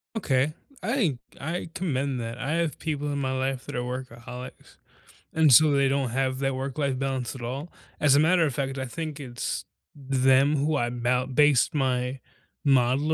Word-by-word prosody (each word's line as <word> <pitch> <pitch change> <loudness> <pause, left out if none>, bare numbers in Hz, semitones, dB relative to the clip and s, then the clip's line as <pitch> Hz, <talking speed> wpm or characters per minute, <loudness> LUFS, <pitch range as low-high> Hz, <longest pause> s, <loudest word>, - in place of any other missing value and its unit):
Okay, 145 -7 +1 0.3
I 210 - +1 0.2
I 170 +3 -3
commend 140 -7 -1
that. 115 +1 -5
I 135 +3 -3
have 165 -2 0
people 150 -2 -3
in 145 - -2
my 130 -1 -1
life 130 0 -2
that - - -6
are - - 0
workaholics, 125 0 -7 0.6
and 155 -5 +5
so 155 +4 +8
they 140 -1 +3
don't 135 -2 0
have 130 +1 -1
that 135 -1 0
work-life 135 0 -2
balance 135 -1 -2
at 125 - -8
all. 135 +8 -5 0.3
As 145 -2 +5
a 145 - +5
matter 170 +2 +4
of 140 - -1
fact, 135 +1 -2
I 130 - -2
think 150 +3 -5
it's 120 -3 -4 0.3
them 135 +1 +3
who 145 +1 +1
I 120 -2 0
mou 125 +1 0
base 145 -1 +4
my 130 -2 0 0.4
model 135 +3 +3
135 Hz, 180 wpm, -26 LUFS, 130-150 Hz, 0.6 s, so